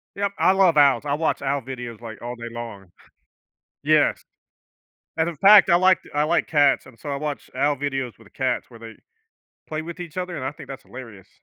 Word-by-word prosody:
Yep, 200 0 -1
I - - +5
love 190 -4 +3
owls, 140 -1 +5
I 140 - -1
watch 160 +2 -1
owl 140 0 -1
videos, 120 -3 -8
like, 115 -2 -9
all 120 +1 -6
day 120 -1 -8
long. 115 -5 -8 1.0
Yes, - - +2 0.9
and 160 +1 +1
in 170 - -6
fact, 200 +4 +7
I 170 - +6
like 185 +1 +4
t - - -17
I 150 +1 +2
like 170 +3 +1
cats, 145 -4 +3
and 125 -3 -16
so 145 - -7
I 140 - -2
watch 150 0 -5
owl 145 0 +1
videos 135 -5 -4
with 115 - -19
the - - -19
cats 130 -1 -2
where 115 -2 -15
they 115 -1 -10 0.7
play 155 0 -3
with 170 +2 -8
each 170 -2 -8
other, 180 -1 -4
and 130 - -5
I 130 - -2
think 150 -1 -13
that's 135 -1 -8
hilarious. 115 -8 -12
140 Hz, 220 wpm, -23 LUFS, 120-165 Hz, 1.0 s, fact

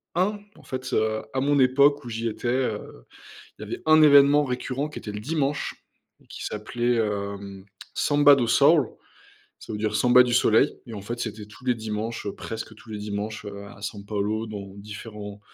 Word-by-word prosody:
1, 200 +4 +1 0.2
en - - -18
fait, 130 -1 -5
heu, 110 0 +1
à 130 - 0
mon 145 +1 +2
époque, 140 +1 +4
où - - -6
j'y 115 0 -2
étais, 115 - -5
heu, 120 - -2 0.5
il - - -7
y - - -6
avait - - -6
1 155 0 +6
événement 145 0 +7
récurrent 130 +2 -3
qui 150 - -8
était 105 - -7
le 105 - -5
dimanche, 145 +3 -2 0.4
et - - -25
qui - - -8
s'appelait, 120 +3 -1
hem, 100 -3 -3 0.3
Samba 145 -1 +5
do 125 -4 0
Sol, 140 +3 +5 0.7
ça - - -9
veut 105 - -3
dire 105 0 -1
samba 125 +3 +6
du 125 -1 -1
soleil 120 +2 +3
et 115 - -9
en 105 - -6
fait, 120 +5 -5
c'était 110 -3 -5
tous 120 +4 -16
les 125 -1 +2
dimanches, 110 0 -4
heu, 100 - -3
presque 110 0 -7
tous 110 - -15
les 105 - -5
dimanches, 105 +1 -4
heu, 100 0 -7
à 100 0 -13
San 100 0 -6
Paolo 105 +2 -2
dans 100 -3 -8
différents 105 0 -9
115 Hz, 200 wpm, -25 LUFS, 105-130 Hz, 0.7 s, événement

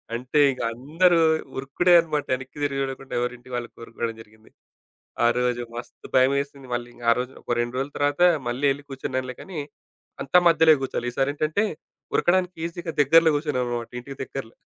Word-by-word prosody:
అంటే 125 +5 -1
ఇగ 130 - -6
అందరూ 165 +8 +2 0.4
ఉరుకుడే 135 +7 +2
అనమాట 155 -3 -1
ఎనక్కి 130 +2 -11
తిరిగి 140 -1 -1
జూడకుండా 135 0 -5
ఎవరి 125 0 -1
ఇంటి 120 +1 -18
వాళ్ళు 120 -1 -3
కోరుకోవడం 115 0 -5
జరిగింది. 110 0 -20 0.7
ఆరోజు 120 +1 +1
మస్తు 120 - -9
భయమేసింది. 140 +1 +1
మళ్ళీ 120 0 -3
ఇంగ 120 - -15
ఆ - - +7
రోజు 125 +1 -3
ఒక 120 - -1
2 120 +1 -4
రోజుల 135 +2 -3
తర్వాత 145 +3 0 0.3
మళ్ళీ 125 +4 -1
ఎళ్లి 145 +1 -12
కూర్చున్నానులే 130 -1 -4
కానీ, 180 -5 -7 0.6
అంతా 160 +6 +5
మధ్యలో 160 -1 +6
కూర్చోలే. 125 -2 -2
ఈసారేంటంటే 150 - 0 0.5
ఉరకడానికి 180 0 +2
ఈజీగా 170 -1 -6
దగ్గర్లో 165 +3 +6
కూర్చున్నాం 145 -4 -1
అన్నమాట 120 -1 -4
ఇంటికి 135 +2 -10
దగ్గరలో. 130 -3 -7
135 Hz, 160 wpm, -24 LUFS, 125-150 Hz, 0.7 s, ఆ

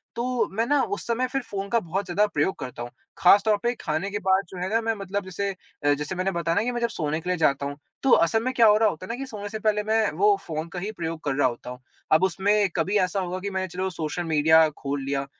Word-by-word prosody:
तो 240 -2 0
मैं 230 - +2
ना 290 +2 +2
उस - - -9
समय 240 +2 0
फिर 270 +2 -2
फ़ोन 200 -5 -5
का 235 - +3
बहुत 195 +1 -3
ज़्यादा 190 +3 +2
प्रयोग 190 -1 0
करता 125 -2 -7
हूँ। 120 - -7 0.3
ख़ास 195 +3 +6
तौर 215 -1 +3
पे 240 0 +1
खाने 160 +6 -2
के 205 - -2
बाद 190 +1 +2
जो 190 - -9
है 180 +1 -2
ना, 225 +2 +2
मैं 225 0 0
मतलब 200 +1 -3
जैसे 195 +2 -3 0.3
अ, 145 0 +4
जैसे 150 +5 -4
मैंने 185 +2 0
बताया 170 -1 -1
ना 205 - +2
कि 245 - -1
मैं 240 -1 -3
जब 235 - +2
सोने 155 -6 -2
के 180 - -5
लिए 180 - +1
जाता 140 -3 +2
हूँ 145 0 -5 0.3
तो 270 - +3
असल 225 +7 0
में 255 +1 -1
क्या 235 -3 +5
हो 210 0 +6
रहा 220 0 +4
होता 175 0 -7
है - - -13
ना - - -2
कि 270 - -4
सोने 210 -5 -7
से 220 - -5
पहले 210 -1 +1
मैं 220 0 +1
वो 205 +2 +5
फ़ोन 160 0 -3
का 180 - -3
ही 200 +4 -4
प्रयोग 165 -5 -5
कर 140 -2 -1
रहा 140 -1 +3
होता 120 0 -6
हूँ। 125 0 -8 0.3
अब 160 +3 +5
उसमें 200 +2 +2
कभी 185 +5 +1
ऐसा 190 +1 0
होगा 185 0 -3
कि 200 +2 -4
मैंने 190 -1 -2
चलो 185 +2 -3
सोशल 170 -1 -4
मीडिया 160 0 +5
खोल 140 0 -3
लिया 140 0 -2
190 Hz, 285 wpm, -25 LUFS, 160-215 Hz, 0.3 s, ख़ास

